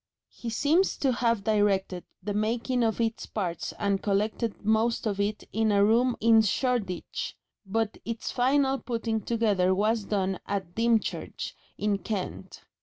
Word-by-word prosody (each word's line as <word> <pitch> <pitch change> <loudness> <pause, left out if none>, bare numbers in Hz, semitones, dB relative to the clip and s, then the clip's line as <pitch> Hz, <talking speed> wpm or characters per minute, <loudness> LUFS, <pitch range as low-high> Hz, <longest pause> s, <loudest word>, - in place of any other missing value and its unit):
He 235 - -6
seems 300 +11 +2
to 270 - +2
have 235 -4 +1
directed 200 -4 +1 0.2
the 205 +1 -2
making 235 +4 0
of 225 0 0
its 225 -1 -1
parts 175 -6 -3
and 200 -1 0
collected 210 +2 -1
most 220 +2 +2
of 200 -2 -1
it 205 +1 -1
in 220 0 +2
a 200 0 +5
room 235 +3 +3
in 225 0 +6
Shoreditch, 220 -4 -1 0.3
but 225 +2 -1
its 230 0 -4
final 270 +2 +2
putting 230 -2 -2
together 205 -6 +2
was 215 +2 +1
done 190 -2 -1
at 190 -3 -3
Dymchurch, 230 0 0 0.2
in 205 -1 0
Kent. 195 0 -5
220 Hz, 145 wpm, -28 LUFS, 200-235 Hz, 0.3 s, in